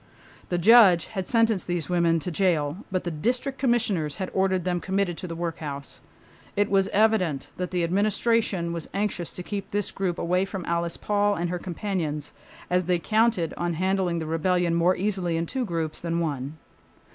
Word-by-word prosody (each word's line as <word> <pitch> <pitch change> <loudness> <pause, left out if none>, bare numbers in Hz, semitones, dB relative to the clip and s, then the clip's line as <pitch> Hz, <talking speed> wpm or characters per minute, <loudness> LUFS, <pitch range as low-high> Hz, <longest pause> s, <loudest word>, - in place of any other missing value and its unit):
The 175 - 0
judge 190 -3 +7
had 190 -3 -3
sentenced 225 -4 +2
these 175 -2 -1
women 170 -2 +2
to 180 - -3
the - - -9
jail, 165 -5 +1
but 185 -1 -1
the 175 - -3
District 250 - -1
Commissioners 215 - +1
had 190 - -4
ordered 190 -1 +1
them 175 0 0
committed 190 -1 -1
to 180 - -5
the 165 - -5
workhouse. 155 -4 -5 0.6
It 205 0 +1
was 195 -1 +3
evident 200 -9 +1
that 180 0 -3
the 180 -2 0
Administration 200 -1 +1
was 170 -2 -5
anxious 200 -4 -1
to 180 - -5
keep 200 +1 -5
this 205 -1 -2
group 185 -3 -2
away 180 +2 +1
from 195 -2 -5
Alice 170 0 -1
Paul 205 0 +1
and 175 -1 -2
her 180 - -2
companions, 170 -5 -3 0.3
as 180 0 +1
they 180 0 +2
counted 215 -1 +1
on 175 -1 -1
handling 185 0 0
the 160 - -3
rebellion 170 +2 +1
more 170 +2 +3
easily 185 -4 -1
in 165 - -1
two 255 +7 -2
groups 165 -5 -3
than 170 0 -1
one. 145 -2 -3
180 Hz, 185 wpm, -26 LUFS, 170-200 Hz, 0.6 s, judge